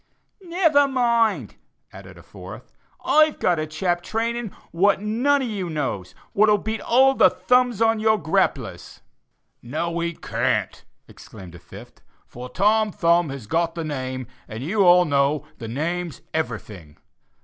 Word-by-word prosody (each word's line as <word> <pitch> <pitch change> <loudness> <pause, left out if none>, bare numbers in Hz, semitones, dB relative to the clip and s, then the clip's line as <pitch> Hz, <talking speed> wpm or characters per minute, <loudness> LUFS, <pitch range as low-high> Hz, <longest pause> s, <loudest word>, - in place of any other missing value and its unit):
"Never 335 -5 +2
mind," 235 -4 0 0.4
added - - -12
a - - -15
fourth, - - -12 0.3
"I've 310 0 +4
got 175 -3 +1
a 155 - -3
chap 175 +2 -1
training 230 +2 -3 0.2
what 195 +4 +2
you 205 - -9
none 265 +6 +1
on - - -2
you 195 -6 -4
knows, 135 - -4 0.2
what'll 210 +1 +4
beat 220 +2 -4
all 265 +3 +4
the - - +5
'thumbs' 250 -3 +1
on 225 -1 +2
your 220 0 +3
grapplers." 160 -4 -2 0.6
"No, 165 +7 -3
he 170 0 -2
can't," - - -2 0.2
exclaimed 95 -6 -13
a 85 - -12
fifth, - - -14 0.2
"for 125 +1 -10
Tom 210 +8 +2
Thumb 170 -4 +2
has 135 -5 -7
got 165 +7 -1
the 165 - -4
name, 130 -4 -4 0.2
and 110 +2 -7
you 200 +7 +1
all 180 0 +6
know 145 0 +1
the 115 - -6
name's 165 +7 -4
everything. 105 - -5
175 Hz, 150 wpm, -22 LUFS, 145-225 Hz, 0.6 s, all